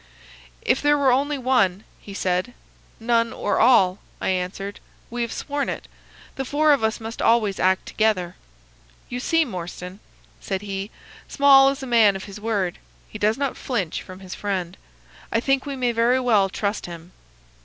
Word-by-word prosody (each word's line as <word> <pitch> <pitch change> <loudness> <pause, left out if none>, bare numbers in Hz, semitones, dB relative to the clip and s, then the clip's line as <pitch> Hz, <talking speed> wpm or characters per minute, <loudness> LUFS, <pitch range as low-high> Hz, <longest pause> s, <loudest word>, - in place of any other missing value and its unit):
"'If - - +2
there 295 0 +4
were 275 -2 +3
only 285 +3 +1
one,' 230 -7 +1 0.2
he 200 - -10
said. 185 +6 -1 0.4
"'None 230 0 +1
or 205 - -1
all,' 205 -6 +5 0.2
I - - -1
answered. 190 +2 -3 0.3
'We 240 0 -3
have 235 -1 -2
sworn 285 0 -3
it. - - -5 0.5
The 270 - -1
four 295 +3 +2
of 275 - 0
us 220 +2 0
must 225 +1 -6
always 220 -4 +2
act 185 0 +2
together.' 185 -5 0 0.7
"'You 245 - -4
see, 330 +5 +2
Morstan,' 180 -2 -7 0.4
said 190 - -4
he, 195 0 -4 0.4
'Small 275 -1 +6
is 275 0 -4
a - - -3
man 225 -5 +4
of 190 - -6
his 200 +1 -9
word. 205 -5 -1 0.3
He 215 - -8
does 215 +3 +2
not 275 -2 -1
flinch 200 -11 -3
from 185 +1 -11
his 185 -1 -8
friend. 185 -4 -3 0.6
I 230 - +2
think 270 +3 0
we 280 - -3
may 250 -2 0
very 235 +2 +2
well 215 -6 +3
trust 200 +1 -3
him. 170 0 -10
220 Hz, 175 wpm, -23 LUFS, 190-255 Hz, 0.7 s, Small